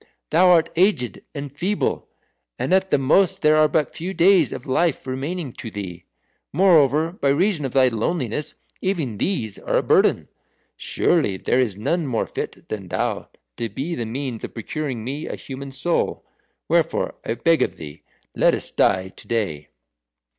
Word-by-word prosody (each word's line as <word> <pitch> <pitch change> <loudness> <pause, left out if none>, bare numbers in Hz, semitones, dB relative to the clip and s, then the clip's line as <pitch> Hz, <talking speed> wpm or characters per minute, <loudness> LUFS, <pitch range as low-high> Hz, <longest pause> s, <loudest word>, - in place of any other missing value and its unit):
Thou 175 +4 +5
art 165 -2 +5
aged 165 - +1
and 140 -1 -5
feeble, 190 +8 -1 0.5
and - - -1
at 190 0 +3
the - - +3
most 160 +9 +2
there 155 0 +5
are 155 0 +5
but 150 0 0
few 185 +4 -4
days 180 -5 +5
of 125 - -6
life 155 +4 +1
remaining 135 +2 -4
to 115 - -7
thee. 95 -5 -7 0.5
Moreover, 160 -3 +4
by 145 -6 -1
reason 165 +1 +1
of 130 - -4
thy 130 -1 +5
loneliness 125 +3 -2 0.3
even 155 - -2
these 115 - -1
are - - 0
a - - +1
burden. - - +3 0.5
Surely 145 - +1
there 125 - +1
is 110 -7 0
none 160 +9 -1
more 120 -4 0
fit - - -6
than 100 -4 -5
thou - - -2 0.3
to 115 - -2
be 145 +9 -4
the 120 -7 -3
means 125 -1 -4
of - - -7
procuring 130 0 -4
me 140 +6 -4
a - - -4
human 140 0 -8
soul. 135 +6 -1 0.4
Wherefore - - +1
I 115 - -2
beg 165 +7 +2
of - - 0
thee, 75 0 -10 0.3
let - - +4
us - - -5
die 95 0 +2
to - - -14
day." 100 -11 -2
140 Hz, 170 wpm, -22 LUFS, 115-170 Hz, 0.5 s, Thou